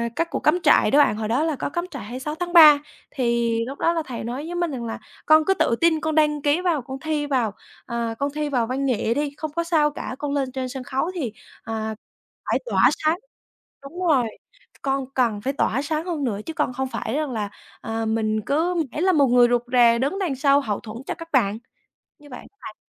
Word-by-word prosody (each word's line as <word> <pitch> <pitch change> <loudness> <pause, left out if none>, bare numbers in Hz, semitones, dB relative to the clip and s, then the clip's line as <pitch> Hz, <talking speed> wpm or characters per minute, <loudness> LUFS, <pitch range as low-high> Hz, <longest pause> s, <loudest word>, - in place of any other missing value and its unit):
các 335 0 -1
cuộc - - -1
cắm 355 - +2
trại - - +5
đó 285 - +5
bạn, 250 -8 +4
hồi 215 -1 -3
đó 245 +7 +1
là 320 -2 0
có - - -3
cắm 345 +4 -3
trại 280 -7 -7
26 260 +7 -5
tháng 350 +1 -4
3, 305 -4 +9 0.3
thì 235 -3 0
lúc 270 +3 -7
đó 335 - +2
là 330 -2 -1
thầy 245 -3 -6
nói 250 +6 -4
với 345 +2 -5
mình 345 -3 -1
rằng 240 -3 -5
là 225 - -5 0.3
"Con 310 0 +5
cứ 385 - +3
tự 235 - +1
tin 330 -1 +4
con 315 -1 -1
đăng 300 -1 +2
ký 290 +4 +2
vào, 345 -6 +1
con 265 +2 -8
thi 305 0 -2
vào, 250 -7 0 0.3
à, 235 -1 -3
con 280 0 -1
thi 300 -1 -1
vào 245 -5 0
văn 265 +3 -2
nghệ 230 -3 +1
đi, 290 +2 -2
không 310 -1 -4
có 335 - 0
sao 315 -3 +2
cả, 255 - -6
con 290 -1 -3
lên 270 -2 -1
trên 260 0 -4
sân 260 0 -6
khấu 270 +7 -2
thì, 260 - -3 0.3
à, 220 -1 -4 0.6
phải - - +2
tỏa - - +4
sáng", 310 +2 +2 0.7
đúng 280 +6 -9
rồi, 270 -7 +4 0.5
"C - - -65
con 270 -1 -1
cần 230 -5 +1
phải 270 +6 -2
tỏa 270 -2 0
sáng 310 +2 -2
hơn 335 -5 -3
nữa 215 -6 -1
chứ 325 - -5
con 255 - -1
không 265 +1 -2
phải - - -4
rằng 300 -2 -1
là, 215 -4 -3 0.3
à, 225 0 -3
mình 220 -1 0
cứ 330 +5 +1 0.2
mãi 300 - -4
là 375 +1 +4
một 285 -4 +4
người 245 0 +5
rụt 240 -1 +2
rè 235 -2 +5
đứng 280 +10 -1
đằng 350 -8 -1
sau 275 +1 +4
hậu 210 -6 -2
thuẫn 215 0 -9
cho - - -1
các 330 -1 -10
bạn." 220 -6 +2 0.6
Như 295 - -16
vậy 250 - -7
á - - -13 0.2
bạn. - - -9
275 Hz, 245 wpm, -23 LUFS, 235-310 Hz, 0.7 s, 3